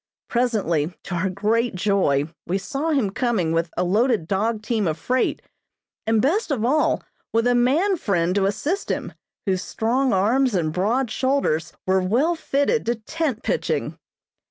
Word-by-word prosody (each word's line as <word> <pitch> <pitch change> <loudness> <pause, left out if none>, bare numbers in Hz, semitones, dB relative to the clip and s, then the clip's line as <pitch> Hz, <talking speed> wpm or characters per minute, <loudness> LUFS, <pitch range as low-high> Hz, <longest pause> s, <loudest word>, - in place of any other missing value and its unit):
Presently, 190 -10 0
to 185 - -6
our 175 +2 0
great 215 +4 0
joy, 180 -8 +1 0.2
we 185 - +1
saw 275 +11 -3
him 265 -11 +1
coming 200 -8 0
with 165 +1 0
a 180 - +2
loaded 210 0 +2
dog 215 +3 0
team 220 -3 0
of 155 -1 -1
freight, 255 +1 0 0.6
and 225 -1 +3
best 350 - +1
of 245 -6 0
all, 300 +5 +2 0.3
with 230 +1 +2
a 245 - +4
man 295 +11 +3
friend 180 - 0
to 195 0 +2
assist 300 - -2
him, - - -3 0.3
whose 190 -3 0
strong 250 +4 0
arms 230 +5 +2
and 155 -4 0
broad 220 +7 0
shoulders 260 - 0
were 190 0 +2
well 245 - +2
fitted 315 - 0
to 235 - +2
tent 260 +2 -3
pitching. - - -1
225 Hz, 160 wpm, -23 LUFS, 185-260 Hz, 0.6 s, a